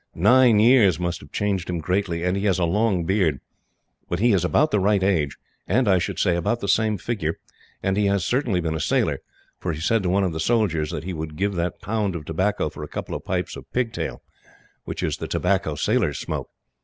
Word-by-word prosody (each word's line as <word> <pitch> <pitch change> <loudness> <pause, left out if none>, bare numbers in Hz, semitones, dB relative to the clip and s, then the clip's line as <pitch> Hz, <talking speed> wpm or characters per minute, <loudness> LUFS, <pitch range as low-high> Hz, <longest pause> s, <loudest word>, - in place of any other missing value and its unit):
Nine 115 +4 +5
years 110 - +5
must 85 -1 -2
have 70 - -15
changed 100 -4 -1
him 90 - -1
greatly, 85 +1 -1
and 90 +1 +1
he 100 +1 -2
has 95 -3 +2
a 90 - +1
long 100 0 +1
beard. 90 -6 +1 0.7
But 90 - -1
he 115 +4 +3
is 95 -3 +2
about 155 +12 +2
the 105 - +2
right 100 0 +2
age, 80 -8 +1 0.3
and, 125 -2 +2
I 95 -2 +4
should 90 - -3
say, 90 -4 +2
about 100 +8 0
the 100 - -4
same 110 +1 +2
figure; 90 -7 -3 0.5
and 95 0 +1
he 105 0 +2
has 100 -3 +1
certainly 120 -7 +1
been 80 -1 -2
a 80 - -3
sailor, - - +1 0.4
for 85 - -2
he 75 - -6
said, 110 +7 +1
to 90 - -1
one 100 +2 +2
of 90 -3 -1
the 80 - -4
soldiers, 80 -6 +1
that 80 -2 -4
he 95 +1 -4
would 80 -1 -5
give 100 +4 0
that 85 -1 -3
pound 105 -4 -1
of 80 -3 -6
tobacco 95 +4 0
for 75 - -9
a - - -5
couple - - -6
of - - -5
pipes - - -2
of - - -12
pigtail, 120 -2 -2 0.6
which - - -5
is - - -1
the - - -5
tobacco 90 -4 0
sailors 95 - +1
smoke. - - -4
95 Hz, 230 wpm, -23 LUFS, 85-105 Hz, 0.7 s, Nine